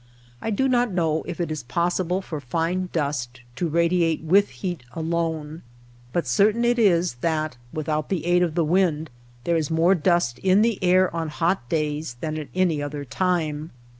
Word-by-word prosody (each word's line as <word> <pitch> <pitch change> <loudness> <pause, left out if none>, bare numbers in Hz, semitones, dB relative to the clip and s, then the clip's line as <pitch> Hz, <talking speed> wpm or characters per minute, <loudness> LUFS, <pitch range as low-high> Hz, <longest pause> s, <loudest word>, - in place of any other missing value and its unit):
I - - -2
do 245 +5 +1
not 245 -3 +2
know 160 -3 +1
if 175 - -5
it 170 -2 -1
is 155 -2 -3
possible 175 +7 -1
for 155 -4 -5
fine 170 +7 -1
dust 135 -6 -2
to 175 - -1
radiate 170 0 +2
with 195 +5 +4
heat 180 -5 -5
alone; 160 -1 -2 0.5
but 170 +4 0
certain 210 - +3
it 240 0 +2
is 175 - +3
that, 155 -4 -1 0.2
without 155 -1 -2
the 170 -5 -2
aid 175 0 +3
of 170 -3 0
the 170 -2 +2
wind, 160 -3 +1 0.3
there 170 -1 +1
is 155 -3 -1
more 165 +3 +4
dust 175 -7 +1
in 190 +2 +4
the 225 -4 0
air 185 -1 +3
on 165 -1 -2
hot 165 -4 -1
days 150 -4 -2
than 155 +2 -3
at 150 - -6
any 175 -5 +2
other 145 0 -5
time. 160 -1 -1
165 Hz, 180 wpm, -24 LUFS, 155-180 Hz, 0.5 s, with